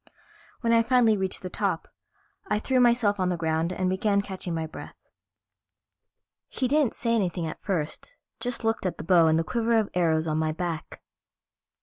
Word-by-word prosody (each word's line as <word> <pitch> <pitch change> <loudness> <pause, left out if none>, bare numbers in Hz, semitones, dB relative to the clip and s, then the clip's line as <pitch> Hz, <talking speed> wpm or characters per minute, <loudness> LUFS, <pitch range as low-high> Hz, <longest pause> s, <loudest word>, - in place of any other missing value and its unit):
When 230 -1 +2
I 230 - +6
finally 230 -2 +4
reached 190 -1 -3
the 185 - -4
top, - - -2 0.6
I - - +1
threw 255 +4 +1
myself 235 -4 +3
on 185 -1 +1
the 180 - -1
ground 160 +1 0
and 185 0 -1
began 200 +2 +1
catching 185 -3 -5
my 160 -1 -2
breath. 160 - -10 1.5
He 255 - -1
didn't 285 -2 +2
say 230 -1 0
anything 180 -6 0
at 160 - -6
first, 190 - -3 0.2
just 245 -1 -1
looked 225 -3 0
at 180 - -4
the - - -6
bow 170 -2 +5
and 160 0 +3
the 165 - +1
quiver 235 +3 +1
of 215 -2 0
arrows 165 -2 +1
on 155 0 0
my 155 -1 0
back. 165 -2 -5
190 Hz, 185 wpm, -26 LUFS, 165-230 Hz, 1.5 s, I